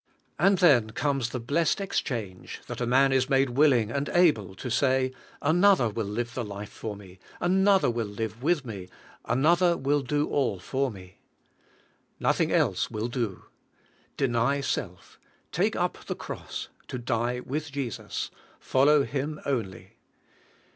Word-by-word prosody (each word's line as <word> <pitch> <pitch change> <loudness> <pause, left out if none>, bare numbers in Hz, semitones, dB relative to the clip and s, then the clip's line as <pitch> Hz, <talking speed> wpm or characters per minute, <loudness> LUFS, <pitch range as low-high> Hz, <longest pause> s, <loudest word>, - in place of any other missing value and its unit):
And 195 0 +4
then 135 - +5
comes 135 +1 -1
the 125 - -4
blessed 145 +10 +1
exchange, 115 - -4
that - - -6
a 120 - 0
man 135 +2 +4
is 130 0 +2
made 135 -2 +3
willing 125 -5 +3
and 140 +3 -2
able 130 - +3
to 125 - -6
say: 130 +1 +2 0.3
"Another 175 - +4
will 110 -1 -3
live 115 +3 -3
the 125 - -3
life 100 -1 -7
for 110 -2 -6
me, 95 -2 -14 0.2
another 190 +2 +3
will 115 -2 -2
live 110 +2 -5
with 150 -1 +1
me, 100 -6 -7 0.4
an 125 +5 +1
other 175 +1 +4
will 145 +2 +1
do 145 +3 0
all 130 -8 0
for 135 +9 -1
me." 95 -4 -12 1.0
Nothing - - +1
else - - +1
will 110 +2 -3
do. 115 -6 -3 0.7
Deny 135 +1 +1
self; 135 - -4 0.3
take - - +1
up - - -2
the - - -3
cross, - - -7 0.2
to 125 - -5
die 120 0 -1
with 145 +4 -4
Jesus; 135 -5 -4 0.3
follow 140 +2 +4
Him 145 +2 -3
onl}'. 110 -10 -3
130 Hz, 150 wpm, -27 LUFS, 115-145 Hz, 1.0 s, then